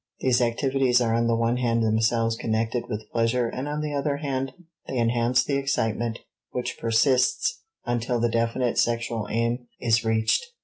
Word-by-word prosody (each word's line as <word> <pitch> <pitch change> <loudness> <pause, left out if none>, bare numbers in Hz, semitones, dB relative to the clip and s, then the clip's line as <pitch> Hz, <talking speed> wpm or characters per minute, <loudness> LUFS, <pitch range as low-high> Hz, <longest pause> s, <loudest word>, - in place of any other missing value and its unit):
These 125 -1 +2
activities 125 +1 +2
are 115 -2 +1
on 115 0 +2
the 115 - +2
one 115 +1 +1
hand 115 -2 +1
themselves 115 +1 +2
connected 115 +1 -1
with 105 -1 -5
pleasure 115 +1 +1
and 130 +4 -4
on 150 +1 -2
the 150 -1 -3
other 140 0 -1
hand 135 -2 -2 0.4
they 130 - -3
enhance 120 +1 +2
the 140 +1 0
excitement 120 -4 -1 0.3
which 125 0 -4
persists 125 - +2 0.2
until 120 0 -1
the 120 - +2
definite 115 +1 0
sexual 115 -2 0
aim 115 +2 -1
is 115 -1 +2
reached. 110 - +2
120 Hz, 165 wpm, -25 LUFS, 115-125 Hz, 0.4 s, These